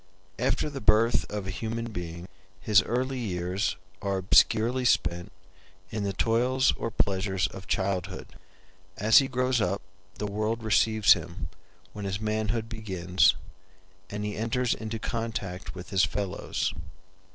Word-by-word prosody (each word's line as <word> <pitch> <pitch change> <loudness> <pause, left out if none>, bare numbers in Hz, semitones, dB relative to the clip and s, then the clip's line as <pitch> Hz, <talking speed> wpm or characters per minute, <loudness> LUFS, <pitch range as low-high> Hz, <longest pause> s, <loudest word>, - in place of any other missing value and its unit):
After 130 +5 +1
the 140 -2 -6
birth 110 +3 +3
of 105 -2 -3
a 95 - -3
human 115 +3 -4
being 85 -2 -6 0.3
his 105 +1 +5
early 130 +3 -1
years 95 -1 -1 0.3
are 100 -1 -1
obscurely 115 +6 +3
spent 90 -7 +1 0.6
in 105 -1 -2
the 100 - 0
toils 125 +6 +2
or 115 - -3
pleasures 95 -3 0
of 95 - -6
childhood. 95 -1 -1 0.7
As 110 +2 +7
he 135 - 0
grows 125 -2 +1
up 95 +1 -1 0.3
the 105 - -4
world 110 +3 -2
receives 110 -1 +5
him, 85 +2 -6 0.4
when 105 -1 -6
his 95 0 -2
manhood 110 +1 -1
begins, 95 -6 +2 0.7
and 105 0 -4
he 105 - -3
enters 115 +2 0
into 110 0 -4
contact 110 -6 -4
with 90 -1 -9
his 95 -1 +3
fellows. 95 +1 -2
105 Hz, 140 wpm, -28 LUFS, 95-115 Hz, 0.7 s, As